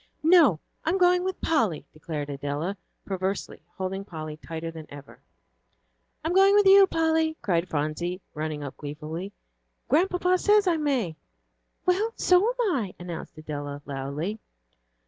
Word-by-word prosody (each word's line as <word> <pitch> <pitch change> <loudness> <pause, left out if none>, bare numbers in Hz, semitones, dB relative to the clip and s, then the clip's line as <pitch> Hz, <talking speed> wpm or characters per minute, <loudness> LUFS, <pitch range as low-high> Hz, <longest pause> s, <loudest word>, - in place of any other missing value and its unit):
"No, 315 - +6 0.2
I'm 335 +4 +1
going 360 -1 +4
with 375 0 -3
Polly," 225 - +1
declared 155 -1 -5
Adela, 145 +7 -3 0.3
perversely, 190 0 -3 0.2
holding 190 +1 -3
Polly 155 -5 -7
tighter 165 +1 -6
than 160 -1 -10
ever. 145 -1 -12 1.1
"I'm 330 - 0
going 390 +2 +6
with 415 -1 +5
you, 390 0 +8
Polly," 320 -1 +1
cried 175 -4 0
Phronsie, 155 +4 -2
running 155 -1 -4
up 140 - -7
gleefully, 155 +6 -6 0.6
"Grandpapa 360 +5 +2
says 415 +1 +4
I 345 -3 +2
may." 255 - -1 0.7
"Well, 410 +5 +1
so 360 0 +4
am 480 -6 +1
I," 210 -8 -3
announced 175 -3 -8
Adela, 145 -2 -6
loudly. 145 +9 -4
190 Hz, 135 wpm, -26 LUFS, -, 1.1 s, you